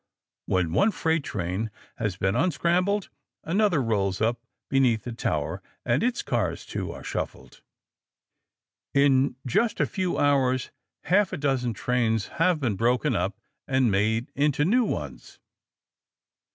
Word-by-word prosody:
When 90 Hz, -4 st, +1 dB
one 200 Hz, -, +4 dB
freight 165 Hz, -6 st, 0 dB
train 95 Hz, +2 st, -3 dB, 0.3 s
has 105 Hz, -5 st, -2 dB
been 95 Hz, +2 st, 0 dB
unscrambled, 180 Hz, +6 st, +1 dB, 0.3 s
another 190 Hz, -1 st, +2 dB
rolls 100 Hz, -4 st, 0 dB
up 115 Hz, +2 st, 0 dB, 0.3 s
beneath 125 Hz, -5 st, +2 dB
the 120 Hz, -, -5 dB
tower, 115 Hz, -, -2 dB, 0.2 s
and 120 Hz, +2 st, +2 dB
its 245 Hz, +2 st, 0 dB
cars, 100 Hz, -9 st, -1 dB
too, -, -, -4 dB
are -, -, -9 dB
shuffled. -, -, -5 dB, 1.3 s
In 140 Hz, -2 st, +4 dB
just 215 Hz, -, +1 dB
a -, -, +4 dB
few 185 Hz, -3 st, -2 dB
hours 130 Hz, -3 st, +2 dB, 0.3 s
half 195 Hz, +2 st, +3 dB
a -, -, -2 dB
dozen 130 Hz, -5 st, 0 dB
trains 115 Hz, -2 st, 0 dB
have 175 Hz, -1 st, +3 dB
been 120 Hz, -8 st, 0 dB
broken 120 Hz, +2 st, +2 dB
up -, -, -1 dB, 0.3 s
and 130 Hz, -4 st, +2 dB
made 110 Hz, +5 st, +1 dB
into 145 Hz, 0 st, +2 dB
new 240 Hz, +7 st, +3 dB
ones. -, -, -5 dB
130 Hz, 135 wpm, -26 LUFS, 110-165 Hz, 1.3 s, one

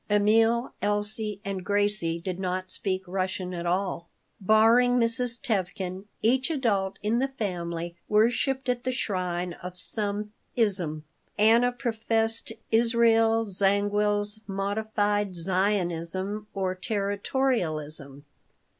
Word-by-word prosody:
Emil, 225 Hz, +4 st, +3 dB
Elsie, 210 Hz, 0 st, -1 dB
and 195 Hz, -2 st, -3 dB
Gracie 205 Hz, -4 st, +1 dB
did 180 Hz, +1 st, -4 dB
not 185 Hz, 0 st, -2 dB
speak 190 Hz, -1 st, -1 dB
Russian 185 Hz, 0 st, -3 dB
at 175 Hz, 0 st, -4 dB
all 180 Hz, -1 st, -1 dB, 0.3 s
Barring 225 Hz, +5 st, +5 dB
Mrs. 235 Hz, 0 st, 0 dB
Tevkin, 190 Hz, -2 st, -2 dB, 0.2 s
each 260 Hz, +5 st, +3 dB
adult 210 Hz, -11 st, 0 dB
in 220 Hz, +3 st, +1 dB
the 270 Hz, -, +1 dB
family 175 Hz, -8 st, -4 dB
worshiped 245 Hz, +5 st, +2 dB
at 245 Hz, 0 st, 0 dB
the 255 Hz, -, 0 dB
shrine 180 Hz, -7 st, -2 dB
of 180 Hz, 0 st, -7 dB
some 210 Hz, +2 st, -3 dB, 0.2 s
"ism." 185 Hz, -9 st, 0 dB, 0.3 s
Anna 230 Hz, +4 st, +5 dB
professed 225 Hz, -2 st, -1 dB, 0.2 s
Israel 225 Hz, -1 st, +4 dB
Zangwill's 205 Hz, +1 st, +1 dB
modified 205 Hz, 0 st, -1 dB
Zionism 190 Hz, +2 st, 0 dB
or 190 Hz, -1 st, -2 dB
Territorialism. 185 Hz, -, -1 dB
205 Hz, 105 wpm, -27 LUFS, 185-225 Hz, 0.3 s, Barring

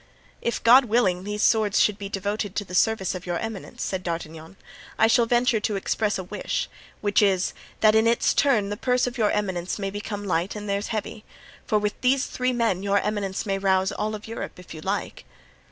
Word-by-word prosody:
"If, 235 Hz, -, -2 dB
God 250 Hz, +3 st, +7 dB
willing, 195 Hz, -6 st, +1 dB
these 210 Hz, 0 st, -2 dB
swords 215 Hz, -3 st, +3 dB
should 210 Hz, -1 st, +3 dB
be 200 Hz, -1 st, -5 dB
devoted 205 Hz, +1 st, -3 dB
to 205 Hz, -, -2 dB
the 180 Hz, -, -11 dB
service 195 Hz, 0 st, +2 dB
of 185 Hz, 0 st, -7 dB
your 175 Hz, -1 st, -1 dB
eminence," 225 Hz, -1 st, -6 dB
said 190 Hz, -1 st, -2 dB
D'Artagnan, 165 Hz, 0 st, -6 dB, 0.4 s
"I 220 Hz, -, +5 dB
shall 230 Hz, +1 st, +4 dB
venture 240 Hz, -1 st, +3 dB
to 210 Hz, 0 st, -1 dB
express 205 Hz, +2 st, 0 dB
a 190 Hz, -, -4 dB
wish, 180 Hz, -, -3 dB, 0.3 s
which 205 Hz, 0 st, +2 dB
is, 190 Hz, -3 st, +2 dB, 0.3 s
that 215 Hz, -1 st, +6 dB
in 220 Hz, +1 st, +4 dB
its 230 Hz, 0 st, +3 dB
turn 230 Hz, -8 st, +2 dB
the 205 Hz, -, -3 dB
purse 250 Hz, +1 st, +1 dB
of 250 Hz, 0 st, -5 dB
your 215 Hz, -2 st, +3 dB
eminence 190 Hz, -4 st, -2 dB
may 195 Hz, -2 st, -3 dB
become 205 Hz, 0 st, -5 dB
light 180 Hz, +1 st, -1 dB
and 210 Hz, 0 st, -6 dB
theirs 200 Hz, +1 st, -1 dB
heavy—for 215 Hz, 0 st, -5 dB
with 210 Hz, 0 st, -2 dB
these 260 Hz, +2 st, +3 dB
three 255 Hz, 0 st, -1 dB
men 230 Hz, -7 st, 0 dB
your 200 Hz, 0 st, +1 dB
eminence 205 Hz, -1 st, -2 dB
may 195 Hz, -1 st, -1 dB
rouse 190 Hz, -1 st, +2 dB
all 215 Hz, +1 st, -2 dB
Europe 225 Hz, +1 st, -6 dB
if 180 Hz, -2 st, -11 dB
you 155 Hz, -, -9 dB
like." 195 Hz, +5 st, -3 dB
205 Hz, 200 wpm, -25 LUFS, 190-225 Hz, 0.4 s, God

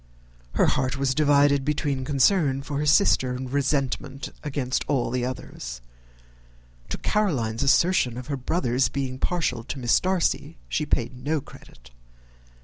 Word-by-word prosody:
Her -, -, +4 dB
heart 130 Hz, +1 st, 0 dB
was 135 Hz, -1 st, +1 dB
divided 145 Hz, -1 st, +4 dB
between 145 Hz, -2 st, -1 dB
concern 140 Hz, 0 st, +2 dB
for 145 Hz, 0 st, -3 dB
her 150 Hz, -, -1 dB
sister 140 Hz, -5 st, +4 dB
and 130 Hz, 0 st, -6 dB
resentment 140 Hz, -1 st, -1 dB
against 135 Hz, -3 st, -2 dB
all 130 Hz, -4 st, 0 dB
others. 60 Hz, -, -6 dB, 1.1 s
To -, -, -3 dB
Caroline's 130 Hz, -, 0 dB
assertion 140 Hz, -3 st, +3 dB
of 125 Hz, -, -6 dB
her 140 Hz, +1 st, -2 dB
brother's 130 Hz, -2 st, 0 dB
being 130 Hz, -2 st, -3 dB
partial 140 Hz, -10 st, -1 dB
to 140 Hz, -, -5 dB
Miss 120 Hz, -2 st, +3 dB
Darcy, 175 Hz, -4 st, -1 dB
she 150 Hz, -, -2 dB
paid 120 Hz, -3 st, 0 dB
no 155 Hz, +2 st, 0 dB
credit. -, -, -16 dB
140 Hz, 140 wpm, -25 LUFS, 125-150 Hz, 1.1 s, Her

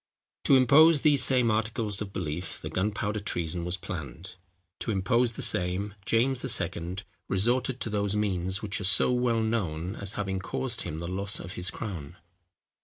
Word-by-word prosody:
To 140 Hz, -, +6 dB
impose 145 Hz, +4 st, +6 dB
these 150 Hz, -3 st, +5 dB
same 125 Hz, -4 st, +4 dB
articles 110 Hz, -1 st, 0 dB
of 100 Hz, -2 st, -5 dB
belief 85 Hz, -1 st, -5 dB
the -, -, -7 dB
Gunpowder 105 Hz, +2 st, -2 dB
Treason 85 Hz, -3 st, -3 dB
was 90 Hz, +1 st, 0 dB
planned! 85 Hz, 0 st, -7 dB, 0.5 s
To -, -, -5 dB
impose 115 Hz, +4 st, +1 dB
the -, -, +1 dB
same, 95 Hz, +1 st, +2 dB
James 120 Hz, +2 st, +1 dB, 0.2 s
II. 85 Hz, +1 st, -4 dB, 0.3 s
resorted 120 Hz, +6 st, 0 dB
to -, -, -2 dB
those 100 Hz, -1 st, -1 dB
means, 95 Hz, -2 st, -1 dB
which 105 Hz, 0 st, -3 dB
are -, -, -4 dB
so 95 Hz, +5 st, +4 dB
well 125 Hz, -2 st, +1 dB
known 95 Hz, -5 st, -2 dB
as 100 Hz, 0 st, -1 dB
having 95 Hz, -2 st, -2 dB
caused 125 Hz, +5 st, -2 dB
him 80 Hz, -3 st, -5 dB
the 85 Hz, +1 st, -5 dB
loss 100 Hz, +3 st, -3 dB
of 85 Hz, -, -7 dB
his 90 Hz, 0 st, -2 dB
crown. 85 Hz, -6 st, -7 dB
100 Hz, 170 wpm, -27 LUFS, 90-115 Hz, 0.5 s, To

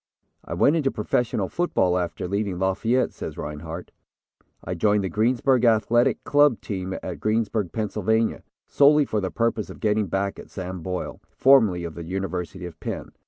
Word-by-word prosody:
"I -, -, -5 dB
went 145 Hz, -, +4 dB
into 150 Hz, -5 st, +1 dB
professional 110 Hz, -3 st, -1 dB
football, 95 Hz, -, +1 dB
after 90 Hz, 0 st, -2 dB
leaving 100 Hz, -1 st, -2 dB
Lafayette," 105 Hz, +7 st, +1 dB
says -, -, -7 dB
Rinehart. 80 Hz, +4 st, -6 dB, 0.7 s
"I 90 Hz, -, -4 dB
joined 105 Hz, +3 st, +2 dB
the 95 Hz, -, -2 dB
Greensburg 120 Hz, -, +2 dB
Athletic 115 Hz, +1 st, +3 dB
Club 145 Hz, -4 st, +4 dB
team 95 Hz, -2 st, -4 dB
at -, -, -5 dB
Greensburg, 110 Hz, -4 st, 0 dB
Pennsylvania, 110 Hz, +2 st, 0 dB, 0.2 s
solely 145 Hz, +1 st, +5 dB
for 105 Hz, -5 st, -1 dB
the 95 Hz, -, -2 dB
purpose 115 Hz, 0 st, -1 dB
of -, -, -10 dB
getting 105 Hz, -1 st, +1 dB
back 95 Hz, +3 st, -2 dB
at -, -, -11 dB
Sam 95 Hz, -2 st, -6 dB
Boyle, 90 Hz, +2 st, -5 dB
formerly 110 Hz, -10 st, +4 dB
of 85 Hz, -2 st, -5 dB
the 85 Hz, -, -7 dB
University 90 Hz, 0 st, -4 dB
of 85 Hz, -3 st, -10 dB
Penn. -, -, -5 dB
105 Hz, 165 wpm, -24 LUFS, 90-115 Hz, 0.7 s, solely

